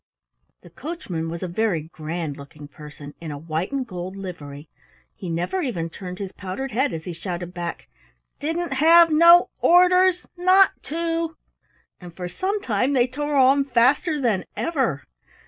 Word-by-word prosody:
The 175 - -15
coachman 185 - -5
was 170 +2 -6
a - - -2
very 180 -3 -1
grand 160 -1 -5
looking 145 +1 -12
person 150 0 -12
in 165 - -6
a 145 - -5
white 160 - -3
and 275 -2 -2
gold 185 -3 -7
livery. 155 -6 -8 0.5
He 185 - -8
never 175 - -2
even 175 - -3
turned 180 +1 -8
his 195 -1 -6
powdered 200 +10 -6
head 265 +5 +1
as 160 - -5
he 180 - -5
shouted 175 +1 -6
back: 175 -1 -6 0.5
"Didn't 325 +1 -2
have 330 +4 +6
no 340 +3 +6
or 360 +1 +6
ders 365 0 +3
not 370 +2 +5
to!" 330 0 -2 0.6
And 175 -2 -12
for 180 0 -5
some 380 - -2
time 250 +4 0
they 245 -3 +4
tore 290 +3 -3
on 270 +1 +5
faster 275 +5 +2
than 225 -8 0
ever. 260 - -1
210 Hz, 165 wpm, -23 LUFS, -, 0.6 s, have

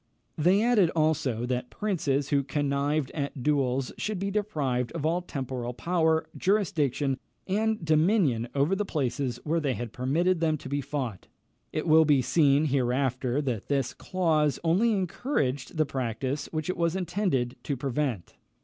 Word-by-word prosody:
They 185 +7 +3
added 225 -8 +4
also, 145 -7 +1
that 125 0 -2
princes 145 -9 -1
who 140 -2 +3
connived 140 0 -1
at 140 -3 -4
duels 135 -3 +1
should 215 -2 -2
be 195 +2 -2
deprived 145 - -1
of 160 -3 -3
all 170 +3 +1
temporal 130 -7 -4
power, 160 -1 +1
jurisdiction, 150 - +1 0.3
and 215 -1 0
dominion 155 - +3
over 145 +7 +2
the 210 - 0
places 130 - -2
where 165 +2 +1
they 140 -5 -1
had 120 -1 -6
permitted 165 +8 +1
them 160 -2 +1
to 135 - -10
be 140 +1 -1
fought. 130 -8 -4 0.4
It 155 - -2
will 160 -1 +6
be 145 -4 +4
seen 145 +1 +3
hereafter 130 0 0
that 120 -7 -3
this 135 -3 0
clause 155 -5 +1
only 185 +8 +3
encouraged 175 - -1
the 155 - +3
practice 130 +1 -3
which 155 -1 -3
it 185 - -2
was 170 0 +1
intended 175 -9 -1
to 140 - -3
prevent. 130 -7 -2
145 Hz, 155 wpm, -27 LUFS, 130-170 Hz, 0.4 s, will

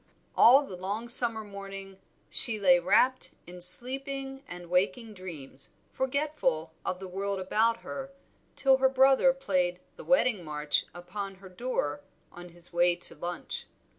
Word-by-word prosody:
All 270 +5 +6
the 190 - -9
long 205 +6 -5
summer 235 -2 +5
morning 195 -1 -9 0.3
she 220 -3 +4
lay 180 -3 +5
wrapt 215 +9 +1
in 180 +1 -12
sleeping 270 +7 +2
and 175 0 -10
waking 195 +6 -1
dreams, 155 -8 -10 0.2
forgetful 260 - -2
of 180 - -3
the 190 - -8
world 195 +1 -4
about 225 +5 0
her, 270 -1 -7 0.5
till 270 -1 +4
her 265 0 +3
brother 265 0 +4
played 185 -9 -1 0.2
the - - -10
Wedding 250 -8 +2
March 150 -1 -2
upon 195 +3 -7
her 190 0 -14
door 180 - -3 0.3
on 175 0 -12
his 175 0 -8
way 175 0 +3
to 175 - 0
lunch. 175 0 -6
195 Hz, 145 wpm, -28 LUFS, 175-255 Hz, 0.5 s, All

